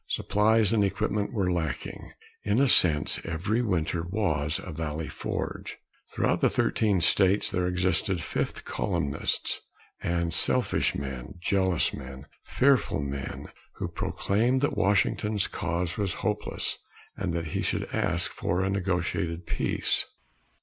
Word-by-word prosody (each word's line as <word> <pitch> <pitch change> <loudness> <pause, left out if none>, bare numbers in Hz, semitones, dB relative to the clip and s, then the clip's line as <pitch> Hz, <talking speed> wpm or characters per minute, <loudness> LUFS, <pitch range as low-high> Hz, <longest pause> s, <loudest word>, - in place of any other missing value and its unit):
Supplies 110 +1 +2
and 105 -2 +4
equipment 105 +1 0
were 95 -6 0
lacking. 80 -6 -3 0.3
In 105 +3 +2
a 140 - +5
sense, 80 - +4
every 100 +8 -1
winter 85 -6 0
was 80 -5 -1
a - - -6
Valley 80 0 -3
Forge. - - -4 0.3
Throughout - - +1
the - - +4
thirteen 100 -5 +2
states 95 +3 +4
there 90 -1 0
existed 95 +1 +1
fifth 80 - -3
columnists 70 0 -1 0.4
and 85 -1 0
selfish - - +2
men, 65 -3 -5
jealous 95 -1 +1
men, 65 +1 -8 0.2
fearful 135 - +2
men, 70 -1 -5 0.2
who - - -4
proclaimed 120 +6 0
that 145 - +1
Washington's 105 +1 +2
cause 90 0 -2
was 100 -3 +1
hopeless, - - -1 0.4
and 95 -3 -2
that 85 -2 -2
he - - -1
should - - -1
ask - - 0
for 90 +2 -1
a 95 - 0
negotiated 90 -3 -1
peace. - - 0
90 Hz, 130 wpm, -28 LUFS, 80-105 Hz, 0.4 s, a